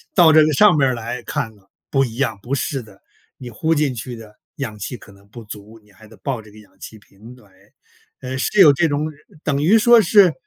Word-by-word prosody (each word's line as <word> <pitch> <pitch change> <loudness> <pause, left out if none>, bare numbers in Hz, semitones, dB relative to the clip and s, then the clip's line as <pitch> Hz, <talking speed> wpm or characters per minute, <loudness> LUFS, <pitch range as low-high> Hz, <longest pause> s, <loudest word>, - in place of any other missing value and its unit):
到 170 -4 +6
这 155 0 +7
个 155 - +1
上 205 +4 +5
边 135 - +3
儿 130 - -1
来 115 +2 -6
看 110 -1 -5
了， 100 -1 -27 0.2
不 135 -1 +2
一 115 -3 -5
样， 120 -5 -2
不 135 +5 -3
是 135 0 -3
的， 100 -3 -18 0.4
你 125 -2 -10
呼 160 +8 -1
进 145 -3 0
去 120 +1 -7
的 110 -2 -14 0.2
氧 110 -7 -6
气 120 +5 -6
可 100 - -17
能 100 +1 -21
不 115 +2 -12
足， 105 +2 -12
你 105 - -25
还 110 +3 -18
得 110 -1 -18
抱 120 +4 -4
着 105 - -17
个 105 - -18
氧 105 - -20
气 110 - -11
瓶 105 +4 -16
来。 105 -6 -22 0.7
呃， 130 +1 -5
是 205 - -1
有 150 -5 +8
这 165 +4 +1
种 145 +1 -2
呃， 155 - -6 0.3
等 140 -1 -1
于 190 +9 +4
说 235 +1 +5
是， 190 -2 +4
125 Hz, 265 characters per minute, -19 LUFS, 110-150 Hz, 0.7 s, 有